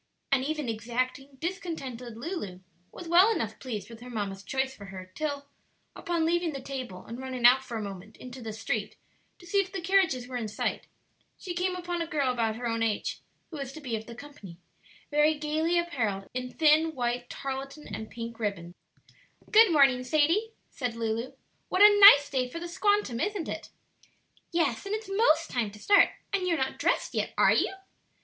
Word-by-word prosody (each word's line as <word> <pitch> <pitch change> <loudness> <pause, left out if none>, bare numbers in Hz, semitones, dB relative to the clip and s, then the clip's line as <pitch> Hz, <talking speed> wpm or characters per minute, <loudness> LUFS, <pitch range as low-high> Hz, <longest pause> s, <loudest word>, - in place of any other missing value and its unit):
And 265 -2 +3
even 300 -1 -2
exacting, 255 +5 -3
discontented 275 - -5
Lulu 230 - -5 0.3
was 350 - -9
well 355 +5 +6
enough 225 - -2
pleased 215 -7 -5
with 230 -1 -11
her 250 +1 -10
mamma's 200 -4 -4
choice 265 +5 -2
for 200 - -11
her 185 -1 -9
till, 285 0 -3 0.5
upon 340 -2 -1
leaving 340 -1 +1
the 275 - -4
table 255 -8 -7
and 235 +2 -8
running 260 -2 -3
out 255 +2 +7
for 245 -3 -5
a 215 - -3
moment 200 +1 -8
into 255 0 -10
the 225 -1 -5
street 215 - -3 0.4
to 350 - -16
see 400 +4 +1
if 385 -1 -1
the 390 - -4
carriages 345 -9 +2
were 250 -1 -4
in 230 -3 -3
sight, 210 - -3 0.5
she 360 - -6
came 365 +1 -1
upon 350 -1 -3
a 335 - -2
girl 290 -6 +1
about 225 -3 0
her 240 +2 -6
own 230 0 -1
age, 220 -2 -1 0.3
who 315 - -6
was 275 -2 -5
to 315 - -8
be 255 -6 -3
of 220 0 -6
the 235 - -9
company, 245 -11 -11 0.5
very 300 +1 +4
gayly 310 +3 0
apparelled 225 - -1
in 250 0 -3
thin 315 +1 +3
white 245 -1 -2
tarletan 275 +2 -6
and 220 - -6
pink 230 +1 -7
ribbons, 190 -6 -3 0.8
"Good 440 -3 +7
morning, 270 -5 +5
Sadie," 325 - +2 0.2
said 245 -4 -3
Lulu. 230 +2 -2 0.4
"What 375 - +4
a 415 0 +8
nice 285 -8 +10
day 260 -3 -1
for 290 - -7
the 345 +1 -5
'squantum,' 410 - +1
isn't 410 -5 -2
it?" - - -6 0.8
"Yes; 335 -1 0
and 410 - -1
it's 435 -1 -6
most 390 -5 +2
time 235 -4 0
to 205 - -13
start, 405 - +5 0.2
and 375 -2 0
you're 335 -2 +2
not 265 -1 -2
dressed - - 0
yet, - - -2
are - - +5
you?" - - +2
270 Hz, 195 wpm, -28 LUFS, 230-335 Hz, 0.8 s, nice